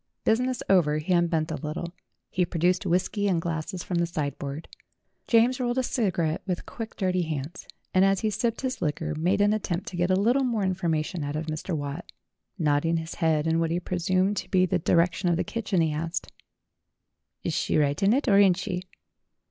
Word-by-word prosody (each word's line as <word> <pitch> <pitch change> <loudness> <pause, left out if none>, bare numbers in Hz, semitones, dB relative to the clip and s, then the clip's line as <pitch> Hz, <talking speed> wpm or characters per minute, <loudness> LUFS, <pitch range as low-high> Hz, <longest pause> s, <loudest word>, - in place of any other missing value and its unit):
Business 250 +2 +1
over, 165 -6 +4
he 155 +4 -1
un 175 -1 +3
bent 160 -2 -1
a 155 - -2
little. 170 +3 -4 0.4
He 185 - +1
produced 175 +1 +1
whisky 185 +4 +1
and 180 -4 +2
glasses 165 +2 -3
from 175 -2 -1
the 170 - +1
sideboard. 145 -1 -4 0.6
James 240 +3 +4
rolled 245 0 -1
a 260 - +2
cigarette 180 - 0
with 180 -2 -2
quick 225 -2 -7
dirty 185 -2 0
hands, 155 +1 -5 0.3
and 185 - +5
as 195 -1 +3
he 220 - 0
sipped 230 +3 -1
his 260 -5 -3
liquor 150 -3 -1
made 180 +6 +1
an 205 +1 +4
at 215 - -1
tempt 175 0 -3
to - - -8
get 175 +1 +1
a 185 - +4
little 240 +8 +3
more 230 -5 0
information 175 -3 -1
out 145 +1 -3
of 155 +1 -2
Mr. 155 +2 -3
Watt. 145 +3 -6 0.5
Nodding 160 0 +2
his 160 0 -5
head 160 -2 +2
in 165 0 +2
what 165 -1 +1
he 170 +2 0
presumed 185 +3 0
to - - -4
be 185 -1 +4
the 180 - 0
di - - 0
rection 175 +2 +2
of 170 - +2
the - - 0
kitchen, 205 -6 -1
he 160 -2 +1
asked: 165 +3 -3 1.1
"Is - - -1
she - - 0
right 145 -1 +1
in 195 +1 +4
it 275 +4 +1
or 200 -3 +6
ain't 190 -3 +5
she?" 185 -1 -3
175 Hz, 210 wpm, -26 LUFS, 160-200 Hz, 1.1 s, or